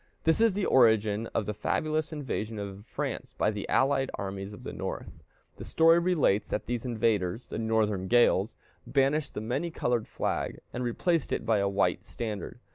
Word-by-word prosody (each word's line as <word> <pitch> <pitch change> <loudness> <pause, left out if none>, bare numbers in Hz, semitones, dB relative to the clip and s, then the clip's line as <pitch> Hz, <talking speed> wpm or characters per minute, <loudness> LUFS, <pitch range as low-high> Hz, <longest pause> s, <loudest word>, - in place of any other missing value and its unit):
This 160 +6 +3
is 225 -4 +4
the 205 - 0
origin 110 -3 +4
of 110 - -2
the 105 - -2
fabulous 155 +8 -1
invasion 120 -7 -4
of 100 0 -7
France - - -4
by 105 - +2
the 105 -2 -5
allied 135 0 +2
armies 95 0 -5
of 105 - -11
the - - -6
North. - - -6 0.3
The - - -8
story 165 +1 +5
relates 170 - +2
that 105 - -2
these 120 -1 -3
invaders 110 -3 0
the - - -4
northern 110 -4 +1
gales 115 -2 +3 0.3
banished 140 +2 +1
the - - -3
many 120 +10 -2
colored 120 -7 -1
flag, - - -2 0.2
and 125 - -3
replaced 160 +6 0
it - - -1
by 110 -2 +3
a 100 0 +1
white 100 0 +1
standard. 110 -1 -5
115 Hz, 180 wpm, -29 LUFS, 105-140 Hz, 0.3 s, story